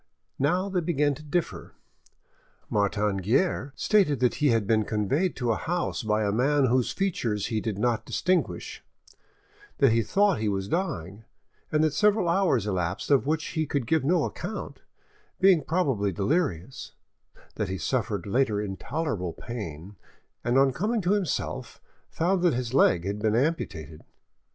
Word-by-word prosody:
Now, 180 Hz, +8 st, +1 dB
they 185 Hz, -2 st, -1 dB
began 150 Hz, -3 st, +1 dB
to 145 Hz, -, -10 dB
differ. 155 Hz, +3 st, -3 dB, 1.0 s
Martin 105 Hz, 0 st, +1 dB
Guerre 130 Hz, -, 0 dB
stated 190 Hz, -, +2 dB
that 125 Hz, -1 st, +2 dB
he 150 Hz, -, +4 dB
had 115 Hz, -5 st, +2 dB
been 110 Hz, +1 st, +2 dB
conveyed 110 Hz, -, 0 dB
to 120 Hz, -3 st, -1 dB
a -, -, +1 dB
house 175 Hz, +3 st, -2 dB
by 110 Hz, -1 st, 0 dB
a 100 Hz, -, +1 dB
man 135 Hz, +6 st, +2 dB
whose 125 Hz, 0 st, +2 dB
features 120 Hz, -, -1 dB
he 110 Hz, -, 0 dB
did 110 Hz, -3 st, -3 dB
not 115 Hz, 0 st, 0 dB
distinguish, 180 Hz, +9 st, -1 dB, 0.9 s
that 135 Hz, -4 st, +4 dB
he 115 Hz, +1 st, +3 dB
thought 200 Hz, -, +2 dB
he 110 Hz, -1 st, 0 dB
was 95 Hz, -1 st, -2 dB
dying, 105 Hz, -, -3 dB, 0.5 s
and 155 Hz, 0 st, +2 dB
that 155 Hz, -2 st, +2 dB
several 210 Hz, +2 st, +3 dB
hours 170 Hz, -, +2 dB
elapsed 95 Hz, -, -2 dB
of 135 Hz, -1 st, +3 dB
which 160 Hz, +1 st, -1 dB
he 160 Hz, -2 st, -2 dB
could 140 Hz, -3 st, -1 dB
give 160 Hz, +5 st, +1 dB
no 165 Hz, +2 st, +2 dB
account, 190 Hz, +5 st, -5 dB, 0.6 s
being 185 Hz, -4 st, +5 dB
probably 135 Hz, -, 0 dB
delirious; 120 Hz, -, -2 dB, 0.6 s
that 105 Hz, -, -3 dB
he 95 Hz, -, -3 dB
suffered 105 Hz, -5 st, -2 dB
later 105 Hz, 0 st, +1 dB
intolerable 105 Hz, -, -3 dB
pain, 100 Hz, -5 st, -7 dB, 0.5 s
and 120 Hz, +2 st, +1 dB
on 135 Hz, -1 st, +4 dB
coming 215 Hz, -, -1 dB
to 180 Hz, +1 st, 0 dB
himself, 205 Hz, -5 st, -2 dB, 0.3 s
found 180 Hz, +3 st, 0 dB
that 175 Hz, -7 st, +3 dB
his 125 Hz, -1 st, -3 dB
leg 90 Hz, -10 st, +4 dB
had 100 Hz, +1 st, -3 dB
been 110 Hz, 0 st, +1 dB
amputated. 85 Hz, -, -2 dB
130 Hz, 155 wpm, -26 LUFS, 105-165 Hz, 1.0 s, being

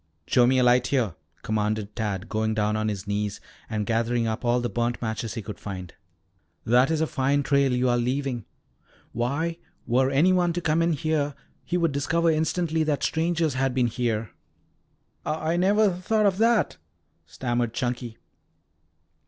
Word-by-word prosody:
"Show 120 Hz, +5 st, +4 dB
me 130 Hz, +1 st, +3 dB
a 125 Hz, -, +4 dB
light 125 Hz, 0 st, +4 dB
here," 125 Hz, -, +1 dB, 0.3 s
commanded 105 Hz, -1 st, -1 dB
Tad 100 Hz, -4 st, -3 dB
going 110 Hz, 0 st, -1 dB
down 105 Hz, 0 st, +1 dB
on 110 Hz, 0 st, -1 dB
his 105 Hz, -2 st, -3 dB
knees 100 Hz, 0 st, -2 dB, 0.3 s
and 105 Hz, -1 st, -2 dB
gathering 115 Hz, +1 st, 0 dB
up 110 Hz, +1 st, -2 dB
all 120 Hz, 0 st, +2 dB
the 120 Hz, -, -1 dB
burnt 120 Hz, 0 st, -1 dB
matches 115 Hz, 0 st, -3 dB
he 115 Hz, -, -4 dB
could 105 Hz, -4 st, -7 dB
find. 90 Hz, -3 st, -7 dB, 0.7 s
"That 125 Hz, +3 st, +4 dB
is 160 Hz, -1 st, 0 dB
a -, -, +3 dB
fine 140 Hz, -1 st, +1 dB
trail 140 Hz, -1 st, +2 dB
you 125 Hz, +1 st, +1 dB
are 120 Hz, 0 st, +2 dB
leaving. 125 Hz, -1 st, -2 dB, 0.7 s
Why, 145 Hz, +8 st, -2 dB, 0.3 s
were 130 Hz, +2 st, +2 dB
any 150 Hz, +7 st, +4 dB
one 175 Hz, -2 st, +2 dB
to 175 Hz, -, -1 dB
come 160 Hz, 0 st, +1 dB
in 165 Hz, 0 st, +2 dB
here, 145 Hz, -1 st, -1 dB, 0.3 s
he 180 Hz, -, -1 dB
would 165 Hz, -3 st, +2 dB
discover 165 Hz, +4 st, +1 dB
instantly 160 Hz, +1 st, 0 dB
that 150 Hz, -2 st, -1 dB
strangers 160 Hz, -2 st, +1 dB
had 130 Hz, 0 st, 0 dB
been 125 Hz, -2 st, +3 dB
here." 115 Hz, -3 st, -1 dB, 0.9 s
"I 155 Hz, +1 st, -1 dB
I -, -, 0 dB
never 200 Hz, +3 st, +4 dB
thought 210 Hz, +4 st, 0 dB
of 195 Hz, -1 st, +2 dB
that," 230 Hz, -1 st, +3 dB, 0.5 s
stammered 120 Hz, -2 st, -2 dB
Chunky. 120 Hz, -2 st, -3 dB
125 Hz, 170 wpm, -25 LUFS, 115-160 Hz, 0.9 s, Show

